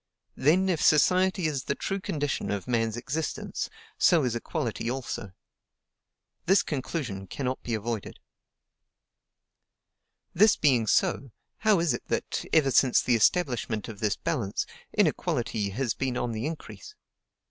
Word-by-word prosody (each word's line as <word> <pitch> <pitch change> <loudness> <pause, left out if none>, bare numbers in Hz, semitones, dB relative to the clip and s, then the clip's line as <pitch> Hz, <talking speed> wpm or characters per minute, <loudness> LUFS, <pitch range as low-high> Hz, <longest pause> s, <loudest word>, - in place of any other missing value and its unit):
Then, 170 +8 +3
if 175 -5 0
society 185 +4 +4
is 145 -5 -1
the 140 - -1
true 195 - -3
condition 145 -6 -2
of 100 +1 -3
man's 115 -2 0
existence, 140 +6 -3 0.3
so 165 -4 +5
is 125 -3 0
equality 115 0 -3
also. 120 -6 -4 1.1
This 195 +3 +5
conclusion 130 - -4
cannot 130 +6 -3
be 115 - -2
avoided. 110 0 -4 2.2
This 205 +4 +5
being 125 -7 +2
so, 135 +5 +1 0.3
how 215 -4 +4
is 165 -6 +2
it 120 - -6
that, - - -2
ever 150 -4 +4
since 130 0 +4
the 125 - +2
establishment 120 - +1
of 110 -3 -8
this 105 -2 +1
balance, 110 -11 -2 0.3
inequality 105 -2 0
has 120 +3 -1
been 130 -2 -2
on 120 - -1
the 110 +4 -3
increase? 165 - -8
130 Hz, 135 wpm, -27 LUFS, 115-160 Hz, 2.2 s, so